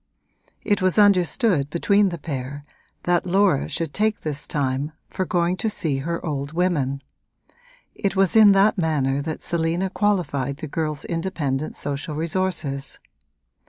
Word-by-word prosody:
It 205 Hz, -3 st, +1 dB
was 185 Hz, +1 st, +2 dB
understood 195 Hz, -, +3 dB
between 200 Hz, +5 st, +2 dB
the 170 Hz, -, -5 dB
pair 145 Hz, -2 st, -6 dB, 0.4 s
that 175 Hz, +1 st, +1 dB
Laura 190 Hz, -5 st, +2 dB
should 165 Hz, -3 st, -3 dB
take 215 Hz, +1 st, 0 dB
this 150 Hz, -2 st, -5 dB
time 140 Hz, 0 st, -1 dB, 0.2 s
for 185 Hz, -, -2 dB
going 175 Hz, +1 st, 0 dB
to 220 Hz, -, 0 dB
see 155 Hz, -9 st, -1 dB
her 170 Hz, +5 st, -3 dB
old 145 Hz, -1 st, -3 dB
women: 145 Hz, -6 st, 0 dB, 0.9 s
it 200 Hz, -1 st, -2 dB
was 195 Hz, 0 st, +2 dB
in 215 Hz, -2 st, +8 dB
that 195 Hz, +1 st, +3 dB
manner 140 Hz, -4 st, +1 dB
that 155 Hz, +1 st, -5 dB
Selina 170 Hz, +3 st, 0 dB
qualified 165 Hz, -11 st, 0 dB
the 155 Hz, -, -6 dB
girl's 155 Hz, 0 st, -3 dB
independent 155 Hz, -5 st, -2 dB
social 145 Hz, +2 st, -4 dB
resources. 155 Hz, -4 st, -1 dB
165 Hz, 140 wpm, -23 LUFS, 145-190 Hz, 0.9 s, in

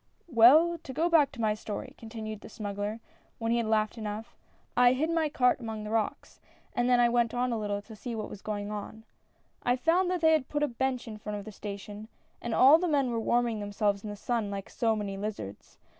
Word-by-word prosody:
"Well, 310 Hz, +8 st, +6 dB
to 290 Hz, -4 st, -9 dB
go 330 Hz, +6 st, +1 dB
back 300 Hz, -5 st, +5 dB
to 245 Hz, -, -6 dB
my 215 Hz, -1 st, +2 dB
story," 210 Hz, 0 st, -6 dB
continued 220 Hz, -2 st, -7 dB
the -, -, -11 dB
smuggler 205 Hz, 0 st, -4 dB, 0.4 s
when 225 Hz, 0 st, -1 dB
he 235 Hz, -, +3 dB
had 230 Hz, -, -1 dB
laughed 215 Hz, +1 st, +1 dB
enough, 215 Hz, +1 st, -6 dB, 0.4 s
"I 245 Hz, 0 st, +6 dB
hid 310 Hz, +6 st, 0 dB
my 325 Hz, -2 st, +1 dB
cart 250 Hz, -3 st, +2 dB
among 220 Hz, -3 st, -5 dB
the 210 Hz, -, -6 dB
rocks, 225 Hz, -2 st, -2 dB, 0.3 s
and 245 Hz, +1 st, +1 dB
then 245 Hz, -1 st, +5 dB
I 240 Hz, -, +6 dB
went 235 Hz, -1 st, +1 dB
on 250 Hz, 0 st, 0 dB
a 225 Hz, -, -1 dB
little 205 Hz, -1 st, -2 dB
to 220 Hz, 0 st, -12 dB
see 235 Hz, +2 st, -5 dB
what 215 Hz, -1 st, -4 dB
was 205 Hz, -, -10 dB
going 205 Hz, -1 st, -4 dB
on. 210 Hz, +1 st, -6 dB, 0.3 s
" -, -, -41 dB
I 245 Hz, -, +2 dB
found 340 Hz, +8 st, +2 dB
they 335 Hz, -3 st, +3 dB
had 310 Hz, -5 st, +2 dB
put 295 Hz, 0 st, 0 dB
a -, -, +3 dB
bench 255 Hz, 0 st, -2 dB
in 215 Hz, -1 st, -7 dB
front 210 Hz, 0 st, -5 dB
of 200 Hz, -, -8 dB
the 215 Hz, -, -7 dB
station, 205 Hz, +1 st, -7 dB, 0.3 s
and 235 Hz, -2 st, -2 dB
all 280 Hz, +5 st, +8 dB
the 360 Hz, -, 0 dB
men 280 Hz, -5 st, +2 dB
were 230 Hz, -, -1 dB
warming 235 Hz, -1 st, +1 dB
themselves 205 Hz, -1 st, -1 dB
in 215 Hz, -, -5 dB
the 205 Hz, -, -5 dB
sun 225 Hz, 0 st, -2 dB
like 200 Hz, -1 st, -6 dB
so 225 Hz, -2 st, +1 dB
many 200 Hz, -2 st, -4 dB
lizards. 195 Hz, -, -6 dB
225 Hz, 235 wpm, -29 LUFS, 210-255 Hz, 0.4 s, all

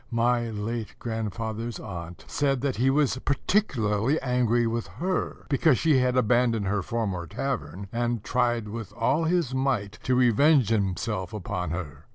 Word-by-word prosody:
My 120 Hz, 0 st, +1 dB
late 110 Hz, +1 st, -4 dB
grandfather's 115 Hz, 0 st, -4 dB
aunt 85 Hz, -4 st, -8 dB
said 135 Hz, -3 st, 0 dB
that 135 Hz, -4 st, -1 dB
he 130 Hz, +4 st, +3 dB
was 135 Hz, -2 st, +2 dB
particularly 135 Hz, -, +1 dB
angry 120 Hz, -2 st, +2 dB
with 115 Hz, 0 st, -2 dB
her, 185 Hz, +1 st, -2 dB
because 140 Hz, -1 st, +3 dB
she 155 Hz, -1 st, +3 dB
had 125 Hz, 0 st, +1 dB
abandoned 120 Hz, -3 st, +2 dB
her 100 Hz, +1 st, 0 dB
former 95 Hz, -5 st, -2 dB
tavern, 95 Hz, -, -4 dB
and 120 Hz, -2 st, -1 dB
tried 120 Hz, -3 st, 0 dB
with 110 Hz, 0 st, -6 dB
all 160 Hz, +4 st, +1 dB
his 165 Hz, -6 st, +1 dB
might 130 Hz, -6 st, -1 dB
to 130 Hz, -, +1 dB
revenge 130 Hz, +1 st, +4 dB
himself 95 Hz, -2 st, -1 dB
upon 90 Hz, -4 st, -3 dB
her. 85 Hz, -2 st, -6 dB
115 Hz, 150 wpm, -26 LUFS, 105-130 Hz, -, revenge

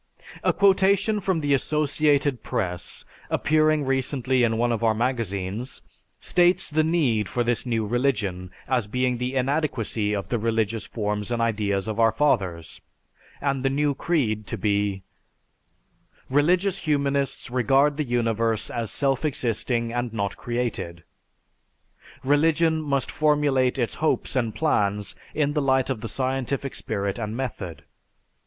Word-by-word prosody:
A -, -, +4 dB
quotation 200 Hz, +2 st, +3 dB
from 190 Hz, -4 st, 0 dB
the 145 Hz, -1 st, +1 dB
Associated 145 Hz, -1 st, +1 dB
Press, 90 Hz, -4 st, -3 dB, 0.2 s
appearing 155 Hz, -1 st, +2 dB
recently 130 Hz, -1 st, 0 dB
in 115 Hz, -1 st, +2 dB
one 120 Hz, +1 st, +1 dB
of 115 Hz, 0 st, -1 dB
our 110 Hz, -1 st, +3 dB
magazines, 115 Hz, -1 st, -2 dB, 0.4 s
states 175 Hz, -2 st, +2 dB
the 155 Hz, +1 st, +3 dB
need 140 Hz, -, +1 dB
for 120 Hz, -, 0 dB
this 120 Hz, +1 st, -1 dB
"new 115 Hz, -2 st, 0 dB
religion" 105 Hz, -7 st, -1 dB, 0.2 s
as 125 Hz, -5 st, 0 dB
being 125 Hz, +2 st, 0 dB
the 125 Hz, +2 st, -2 dB
inadequacy 125 Hz, -6 st, 0 dB
of 100 Hz, -, -4 dB
the 120 Hz, -, 0 dB
religious 110 Hz, 0 st, -1 dB
forms 105 Hz, -1 st, -3 dB
and 120 Hz, -, 0 dB
ideas 105 Hz, -4 st, 0 dB
of 110 Hz, 0 st, -3 dB
our 115 Hz, -1 st, +5 dB
fathers, 95 Hz, -, 0 dB, 0.6 s
and 140 Hz, -2 st, 0 dB
the 135 Hz, -, +2 dB
new 145 Hz, +1 st, +1 dB
creed 120 Hz, -10 st, -1 dB
to -, -, -3 dB
be: 100 Hz, -2 st, 0 dB, 1.3 s
"Religious 180 Hz, +7 st, +2 dB
humanists 140 Hz, -4 st, -1 dB
regard 135 Hz, +4 st, +3 dB
the 155 Hz, -, 0 dB
universe 115 Hz, -3 st, 0 dB
as 115 Hz, -3 st, -2 dB
self 135 Hz, -1 st, +1 dB
existing 120 Hz, -4 st, -1 dB
and 120 Hz, -1 st, -2 dB
not 100 Hz, -2 st, -2 dB
created. 120 Hz, -8 st, -3 dB, 1.2 s
"Religion 160 Hz, +3 st, +3 dB
must 140 Hz, -3 st, -1 dB
formulate 145 Hz, -4 st, +2 dB
its 120 Hz, -3 st, -1 dB
hopes 155 Hz, -, 0 dB
and 115 Hz, -4 st, 0 dB
plans 105 Hz, -, 0 dB, 0.2 s
in 145 Hz, -1 st, +1 dB
the 150 Hz, -, +1 dB
light 130 Hz, -1 st, +2 dB
of 120 Hz, -5 st, -3 dB
the 115 Hz, -, -5 dB
scientific 135 Hz, +2 st, -2 dB
spirit 100 Hz, +2 st, -3 dB
and 110 Hz, 0 st, -4 dB
method. 100 Hz, -, -5 dB
125 Hz, 140 wpm, -24 LUFS, 110-145 Hz, 1.3 s, our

